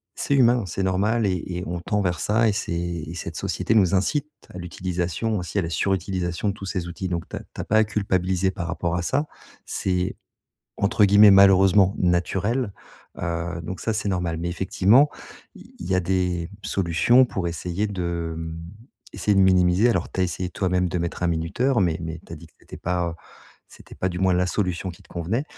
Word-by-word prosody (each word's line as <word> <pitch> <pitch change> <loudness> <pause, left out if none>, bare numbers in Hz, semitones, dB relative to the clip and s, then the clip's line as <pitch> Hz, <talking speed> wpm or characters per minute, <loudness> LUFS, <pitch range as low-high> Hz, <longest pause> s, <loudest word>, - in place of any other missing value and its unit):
c'est 140 - 0
humain, 120 -4 +4
c'est 95 +3 -3
normal 105 +5 +1
et 90 -4 -1
et 90 -1 -4
on 85 +1 -3
tend 105 +4 -1
vers 90 -3 -1
ça 115 +2 +2
et - - 0
c'est 85 -4 -3
cette 90 - -6
société - - -1
nous 95 -4 +4
incite 145 +11 0 0.2
à - - -8
l'utilisation, 90 +4 -2
ainsi 90 +2 -5
à - - 0
la 85 - -3
surutilisation 95 0 -1
de - - -1
tous 100 - -9
ces 95 -3 -3
outils. 90 +2 -5
Donc 85 -2 -3
tu - - -6
as - - -4
tu - - -9
as - - -4
pas 110 +1 +4
culpabiliser 95 -3 0
par 85 -2 -5
rapport 85 -1 -2
à 90 - -1
ça. 145 - 0 0.4
C'est 90 -1 -1 0.6
entre 100 +1 +3
guillemets, 100 +1 +7
malheureusement: 95 0 +6
«naturel». 95 +6 0 0.5
Heu, 85 -1 -3
donc 90 +3 -6
ça, 115 - -1
c'est 105 -1 -2
normal. 90 -4 -1
Mais 85 +1 -3
effectivement 100 - +3 0.4
il - - -15
il 85 - -7
y - - +3
a 90 - +3
des 90 -1 -1
solutions 95 +8 +3
pour 95 -7 -3
essayer 90 +4 -2
de, 85 -4 -3
mmh, 80 0 -6 0.6
essayer 105 - +1
de - - +5
minimiser. 95 +3 +4
Alors 90 -7 -1
tu - - -3
as - - +4
essayé 90 +1 -3
toi-même 90 0 0
de 90 - -2
mettre 85 +1 -4
un 90 - +2
minuteur 95 +10 0
mais 85 -4 +1
mais 80 0 -5
tu - - -11
as - - -6
dit 85 - -13
que - - -32
c'était - - -11
pas, 90 -1 -1
heu, - - -8 0.5
c'était - - -15
pas 95 - -1
du 90 -1 -4
moins 95 0 +2
la 90 +1 +2
solution 90 -1 -2
qui 85 - -14
te - - -24
convenait. 95 - -2
90 Hz, 210 wpm, -24 LUFS, 85-100 Hz, 0.6 s, guillemets